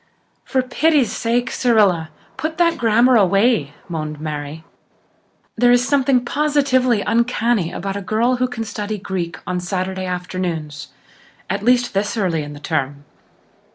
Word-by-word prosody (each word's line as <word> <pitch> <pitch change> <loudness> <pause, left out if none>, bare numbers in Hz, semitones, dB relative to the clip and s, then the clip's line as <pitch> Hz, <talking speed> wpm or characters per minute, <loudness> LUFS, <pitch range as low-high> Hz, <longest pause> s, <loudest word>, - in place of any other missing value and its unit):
"For 260 -1 0
pity's 290 0 +2
sake, 240 +2 -1
Cyrilla, 200 -10 +2 0.3
put 315 +1 -4
that 335 -1 +2
grammar 235 +2 +4
away," 195 - +2
moaned 155 -3 -5
Mary. 150 0 -5 0.9
"There 245 +1 +4
is 245 +1 +3
something 270 -3 +2
positively 260 -5 +2
uncanny 235 -5 +1
about 195 +1 -4
a 200 - -3
girl 230 +6 +1
who 255 +1 +1
can 245 -2 -5
study 210 0 -4
Greek 185 -4 -4
on 180 0 -2
Saturday 185 +1 -3
afternoons 180 -5 -4 0.6
at 195 +1 -2
least, 245 +2 +2
this 205 +3 -1
early 180 -6 0
in 145 0 -7
the 145 - -10
term." 145 -2 -3
210 Hz, 140 wpm, -19 LUFS, 175-245 Hz, 0.9 s, grammar